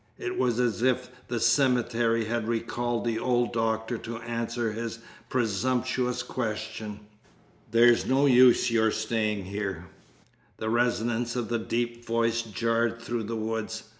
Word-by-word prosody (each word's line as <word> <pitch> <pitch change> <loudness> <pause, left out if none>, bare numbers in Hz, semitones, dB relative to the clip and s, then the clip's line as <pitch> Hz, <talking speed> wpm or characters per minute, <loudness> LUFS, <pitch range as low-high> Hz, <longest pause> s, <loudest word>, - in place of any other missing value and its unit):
It 370 -2 -4
was 120 - +1
as 120 -2 +1
if 125 0 +1 0.2
the 120 -1 -2
cemetery 120 -2 +2
had 115 0 -2
recalled 120 +1 -1
the 115 -1 0
old 120 -1 +1
doctor 110 0 -1
to 115 0 -6
answer 115 0 -2
his 115 +1 -4 0.3
presumptuous 125 +2 0
question. 110 -3 -4 0.7
"There's 120 +1 +5
no 135 +2 +3
use 125 -2 +6
your 110 -1 +3
staying 110 -2 -1
here." 95 -3 -4 0.7
The 110 0 -2
resonance 120 0 0
of 120 -2 -2
the 120 -1 0
deep 120 +1 -2
voice 115 0 +1
jarred 115 +1 0
through 115 -1 -3
the 115 +2 -3
woods. 110 0 -3
115 Hz, 135 wpm, -27 LUFS, 110-120 Hz, 0.7 s, use